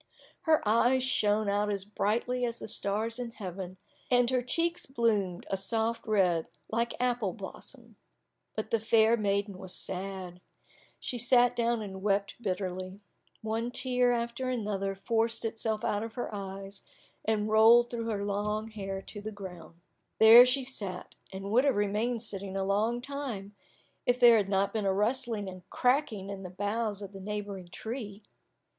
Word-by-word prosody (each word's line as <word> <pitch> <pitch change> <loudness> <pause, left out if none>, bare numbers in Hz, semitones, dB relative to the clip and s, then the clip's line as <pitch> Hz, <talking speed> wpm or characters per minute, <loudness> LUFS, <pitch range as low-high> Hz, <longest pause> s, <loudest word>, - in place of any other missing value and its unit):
Her 310 -8 +4
eyes 240 +4 +4
shone 215 -4 +2
out 205 +1 +1
as 200 -2 +1
brightly 230 +4 -1
as 235 -1 -1
the - - -7
stars 220 +3 0
in 245 -1 -3
heaven, 190 -4 -7 0.3
and 245 0 +4
her 255 -1 +2
cheeks 335 +7 -1
bloomed 215 -8 0
a 195 - +1
soft 225 +4 -1
red 180 -6 +2 0.2
like 235 +1 0
apple 245 -6 0
blossom. 230 +2 -10 0.6
But 215 0 -4
the 230 - +3
fair 220 +1 +4
maiden 200 -2 -1
was 185 -1 -4
sad. 185 -1 -5 0.6
She 245 - -4
sat 245 +1 +4
down 235 -1 +1
and 190 -2 -7
wept 200 +2 0
bitterly. 185 -1 -4 0.4
One 225 +2 -1
tear 250 0 +2
after 235 +2 -2
another 205 -5 -2
forced 230 +3 0
itself 220 -1 -2
out 205 - 0
of 225 0 -6
her 245 -3 -4
eyes, 195 0 -7 0.4
and 215 -1 0
rolled 225 +2 +6
through 230 -1 -3
her 205 -3 -2
long 210 +2 -2
hair 195 -3 -5
to 205 - -8
the 215 +1 -5
ground. 180 -4 -10 0.4
There 230 +3 +10
she 260 +2 +1
sat, 200 -8 -5 0.2
and 195 +1 -6
would 245 +4 +5
have 280 -3 +3
remained 215 +3 0
sitting 195 -3 -4
a 195 - 0
long 215 +5 +1
time, 250 -8 -5 0.5
if 245 0 +3
there 240 -2 +8
had 200 -2 0
not 195 0 +1
been 215 -3 0
a 190 - +3
rustling 225 0 0
and 185 -1 -8
cracking 250 -7 +1
in 195 -1 -6
the 185 - -7
boughs 205 +2 -2
of 200 - -8
the 195 - -9
neighbouring 205 -2 -5
tree. 215 +2 -6
215 Hz, 165 wpm, -30 LUFS, 195-235 Hz, 0.6 s, There